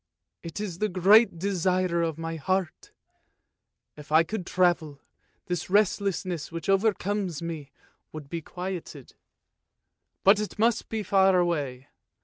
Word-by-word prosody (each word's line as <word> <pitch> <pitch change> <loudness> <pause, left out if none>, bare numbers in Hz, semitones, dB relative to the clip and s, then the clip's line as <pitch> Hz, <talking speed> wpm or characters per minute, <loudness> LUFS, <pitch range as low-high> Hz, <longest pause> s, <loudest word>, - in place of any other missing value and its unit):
It 165 +3 -7
is 190 -5 -5
the 215 - 0
great 195 +2 +5
desire 185 -1 0
of 165 -2 -1
my 165 0 -4
heart! 185 +2 -2 1.0
If 150 0 -13
I 160 +2 +6
could 185 +1 -5
travel, 175 -5 +1 0.5
this 175 -1 -3
restlessness 190 -4 0
which 165 -1 -6 0.3
comes 195 -5 -2
over - - -4
me 155 -5 -6 0.4
would 155 -2 -9
be 165 +3 -5
quieted. 175 -6 -7 1.1
But 200 +2 +6
it 210 - -5
must 225 +2 +1
be 220 -1 -3
far 190 -1 +4
away 145 -7 -1
180 Hz, 130 wpm, -27 LUFS, 165-195 Hz, 1.1 s, I